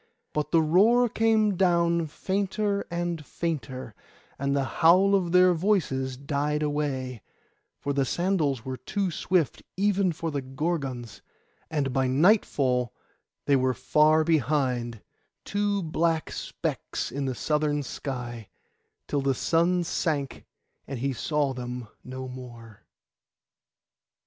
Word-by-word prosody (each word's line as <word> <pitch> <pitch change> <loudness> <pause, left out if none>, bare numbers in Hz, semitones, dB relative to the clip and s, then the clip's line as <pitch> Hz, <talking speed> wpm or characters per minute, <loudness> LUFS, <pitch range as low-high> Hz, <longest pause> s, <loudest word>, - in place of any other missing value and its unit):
But 150 -1 -1
the 165 -1 +4
roar 215 +10 +5
came 220 -2 +2
down 170 -2 +2
fainter 200 +4 -1
and 170 -2 -2
fainter, 135 -8 -4 0.5
and 140 +1 0
the 140 - +1 0.2
howl 185 +5 +6
of 185 -4 +2
their 180 0 +6
voices 155 -9 0
died 145 +2 -1
away; 135 -5 -2 0.6
for 140 - -2
the 140 0 +2
sandals 150 -5 0
were 130 -1 -4
too 195 +4 -2
swift, 165 -5 0 0.2
even 200 -2 +2
for 165 0 -4
Gorgons, 135 -4 -3 0.5
and 140 -4 -1
by 130 0 +2
nightfall 130 - +2 0.5
they 140 - +4
were 130 -1 +2
far 155 +5 +4
behind, 130 -7 0 0.4
two 205 -1 0
black 160 0 0
specks - - -4
in 140 0 -3
the 130 -2 -2
southern 150 +1 0
sky, 120 -5 -6 0.6
till 145 - 0
the 135 -1 +1
sun 175 +5 +2
sank 150 -5 -2 0.4
and 135 - -4
he 135 +3 -1
saw 145 +1 0
them 125 -1 -6 0.2
no 130 0 -6
more. 120 -4 -11
150 Hz, 120 wpm, -27 LUFS, 130-175 Hz, 0.6 s, howl